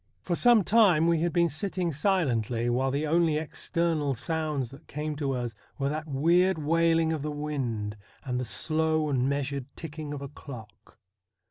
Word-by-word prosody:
For 175 - -1
some 240 +1 +5
time 195 -7 +5
we 170 -1 +3
had 170 0 +1
been 170 0 +3
sitting 175 +2 -2
silently, 125 - +1
while 130 +2 +1
the 140 +3 -1
only 160 0 +2
external 160 -2 -1
sounds 150 -2 -2
that 140 +4 -14
came 150 +1 -4
to 140 -2 -1
us 120 -2 -3 0.2
were 140 0 0
that 155 +2 -4
weird 170 +6 +3
wailing 165 +1 +2
of 155 - -3
the 150 - -3
wind 130 -8 -3 0.3
and 125 -2 -2
the - - -1
slow 155 +4 0
and 130 -1 +1
measured 140 -1 -2
ticking 155 -2 -7
of 145 -1 -5
a - - -4
clock. 125 -6 -12
150 Hz, 170 wpm, -28 LUFS, 135-165 Hz, 0.3 s, some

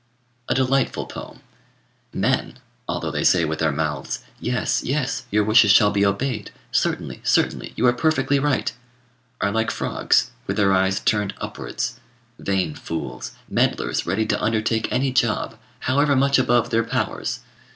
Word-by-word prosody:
A - - +2
delightful 135 +1 +1
poem! - - -10 0.7
Men, - - 0 0.3
although - - -2
they - - -2
say 85 -3 +4
with 80 0 -3
their 80 -1 +2
mouths, 75 -2 -3 0.2
"Yes, 125 +1 0
yes, 135 -2 -1
your 105 -1 +2
wishes 110 0 +5
shall 105 +1 +6
be 100 -1 +1
obeyed, 105 +2 -1 0.2
certainly, - - -1
certainly, - - +1
you 120 - +1
are 120 - +5
perfectly 140 0 +1
right," 145 -1 0 0.7
are 100 - +1
like 110 +1 0
frogs, - - +1 0.2
with 95 - -2
their 100 -2 +4
eyes 95 +1 +2
turned 105 -2 0
upwards. - - -4 0.4
Vain 95 -5 -1
fools! 65 -7 -6
meddlers - - 0
ready 100 +5 +1
to - - -1
undertake 110 0 0
any 130 +1 +1
job, 120 -4 0 0.3
however 140 +2 +2
much 135 +1 +3
above 120 -2 +2
their 115 0 +2
powers! 115 - -2
110 Hz, 150 wpm, -22 LUFS, 95-130 Hz, 0.7 s, shall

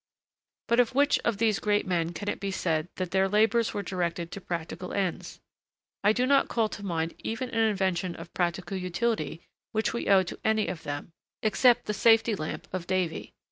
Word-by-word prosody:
But 235 +1 +3
of 245 +1 +3
which 285 +1 +4
of 230 -3 -1
these 215 -2 +2
great 205 0 +1
men 170 -3 0
can 205 +4 -7
it - - -1
be 200 - -3
said 165 -4 -1
that 185 -2 -3
their 190 0 +2
labors 220 +3 +3
were 205 - -3
directed 175 -2 -2
to 200 - -7
practical 175 +1 -5
ends? 190 -4 -2 0.6
I 205 - +6
do 245 +3 +1
not 275 +1 +4
call 225 -2 +1
to 205 - -8
mind 165 -3 -2
even 250 +3 -4
an 225 -1 +3
invention 185 -3 -1
of - - -10
practical 175 +1 -1
utility 180 -3 -2 0.3
which 220 0 0
we 235 - -3
owe 195 -1 +6
to 180 - -8
any 220 -1 +2
of 175 -3 -5
them, 145 +1 -5 0.3
except 240 +3 +4
the 210 - -1
safety 225 +1 +4
lamp 155 -6 -4
of 180 -2 -4
Davy. 185 -3 -2
195 Hz, 195 wpm, -28 LUFS, 175-220 Hz, 0.6 s, I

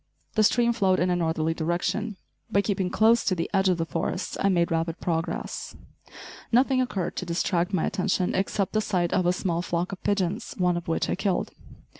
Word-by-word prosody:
The 215 - +2
stream 235 +2 +3
flowed 190 -5 +2
in 180 +1 +2
a - - +2
northerly 160 -1 0
direction. 180 +6 -2 0.3
By 200 - +3
keeping 190 -3 -1
close 225 +4 +4
to 185 - +1
the 165 - -2
edge 190 -1 +3
of 180 - +2
the 165 - -1
forest 165 0 -3
I 195 - +2
made 170 -3 +2
rapid 165 0 -1
progress. 165 -1 -3 0.8
Nothing 255 +2 +4
occurred 195 -8 -2
to - - -3
distract 170 +1 0
my 185 -5 +1
attention, 185 -1 0
except 195 0 -1
the 215 - +2
sight 180 -5 0
of 185 -2 +2
a - - +5
small 175 -2 -1
flock 175 +1 -2
of 190 - -7
pigeons, 200 +3 -1
one 180 -1 +2
of 175 0 -5
which 165 - 0
I - - 0
killed. 195 0 -1
185 Hz, 200 wpm, -26 LUFS, 170-200 Hz, 0.8 s, a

